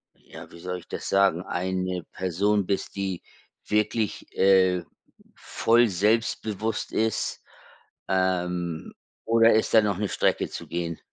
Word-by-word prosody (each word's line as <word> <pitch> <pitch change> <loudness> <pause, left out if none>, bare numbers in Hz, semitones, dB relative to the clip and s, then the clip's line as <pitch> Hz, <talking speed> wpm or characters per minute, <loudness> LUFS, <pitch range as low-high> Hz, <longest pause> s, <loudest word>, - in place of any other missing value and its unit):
ja, - - -13
wie 85 - -13
soll 90 +1 -4
ich - - -18
das - - -5
sagen- 95 -3 +3
eine 90 0 -2
Person 95 +2 0
bist, 100 - -2
die 95 -3 -3 0.5
wirklich, 105 0 0
äh, 95 -2 +4 0.5
voll 115 +1 +2
selbstbewusst 110 +2 0
ist, 110 0 -1 0.7
ähm, 90 -3 -1 0.3
oder 115 0 +5
ist 110 - +1
da 110 - +8
noch 100 -3 0
'ne 105 +1 -1
Strecke - - 0
zu - - -8
gehen? 85 -1 -4
95 Hz, 130 wpm, -26 LUFS, 90-105 Hz, 0.7 s, da